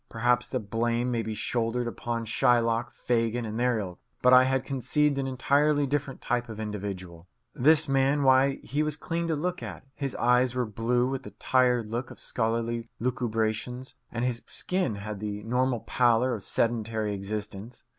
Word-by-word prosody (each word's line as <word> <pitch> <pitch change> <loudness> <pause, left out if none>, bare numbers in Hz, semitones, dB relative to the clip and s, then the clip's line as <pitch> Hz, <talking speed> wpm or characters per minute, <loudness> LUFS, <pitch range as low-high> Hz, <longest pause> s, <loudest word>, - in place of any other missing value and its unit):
Perhaps 120 +2 +1
the 130 - -1
blame 115 +3 -1
may 115 -1 0
be 110 -1 -4
shouldered 120 +2 -1
upon 115 +1 -3
Shylock, 120 +1 +2
Fagin, 120 -1 0
and 110 +1 -4
their 125 -1 +2
ilk; 95 -4 -5 0.2
but 125 0 +6
I 130 0 +8
had 130 0 0
conceived 140 +2 +1
an 135 - -1
entirely 145 +3 +2
different 140 -1 -2
type 120 -1 -1
of 110 -1 -7
individual. 95 -5 -6 0.3
This 150 +3 +4
man 135 +1 +2
why, 135 +1 +5
he 145 +2 -1
was 155 -1 -1
clean 170 0 -2
to 160 - +1
look 180 +4 -2
at, - - -7
his 140 -3 -4
eyes 125 +1 +3
were 125 -1 +1
blue, 115 +3 0
with 135 0 -3
the - - -9
tired 125 -3 +2
look 120 +3 -3
of - - -12
scholarly 115 0 -2
lucubrations, 120 +1 -2 0.2
and 120 +1 -1
his 120 -2 -1
skin 180 - -1
had 100 0 -6
the 105 0 -4
normal 125 +1 0
pallor 120 +2 +2
of 110 - -4
sedentary 110 -1 0
existence. 105 +3 -6
120 Hz, 175 wpm, -28 LUFS, 110-130 Hz, 0.3 s, I